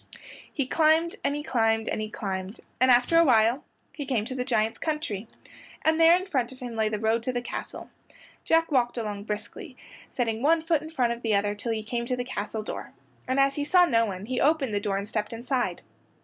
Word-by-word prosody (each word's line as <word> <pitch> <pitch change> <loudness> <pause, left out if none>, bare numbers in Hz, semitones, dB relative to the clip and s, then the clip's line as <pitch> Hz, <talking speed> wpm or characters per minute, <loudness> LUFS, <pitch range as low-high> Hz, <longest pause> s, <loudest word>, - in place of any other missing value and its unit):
He 275 - -1
climbed 320 +4 +3
and 285 - 0
he 295 - -4
climbed 225 -4 +1
and - - -2
he 215 - -4
climbed, 195 0 -5 0.2
and 255 +1 +4
after 250 +7 +5
awhile 245 -4 +4 0.3
he 285 -3 -6
came 235 -6 0
to 255 - -5
the 255 -1 -2
giant's 225 -4 0
country, 300 -10 -3 0.6
and 315 +1 +3
there 330 +1 +8
in 370 - -5
front 265 -11 -1
of 260 - -12
him 245 -3 -6
lay 220 -1 +1
the 215 - -2
road 220 +2 +1
to 255 - -2
the 245 - -1
castle. - - -6 0.6
Jack 330 0 +2
walked 245 -3 +1
along 205 -3 -4
briskly, 220 - -6 0.3
setting 225 -3 -2
one 320 +3 +3
foot 325 -2 +1
in 315 - -8
front 250 -7 +1
of 235 - -10
the 225 -3 +1
other 205 +1 +1
till 210 +3 -4
he 220 -1 -2
came 235 +2 -3
to 250 - 0
the 245 - -2
castle 220 -3 -4
door, - - -7 0.3
and 260 +1 +1
as 275 0 +4
he 290 - -2
saw 355 +4 +5
no 230 -7 +2
one 190 0 -5
he 250 +2 -2
opened 285 -6 +2
the 205 - +1
door 200 -1 -1
and 200 +1 -4
stepped 210 0 -3
inside. 240 -5 -2
245 Hz, 225 wpm, -26 LUFS, 220-285 Hz, 0.6 s, there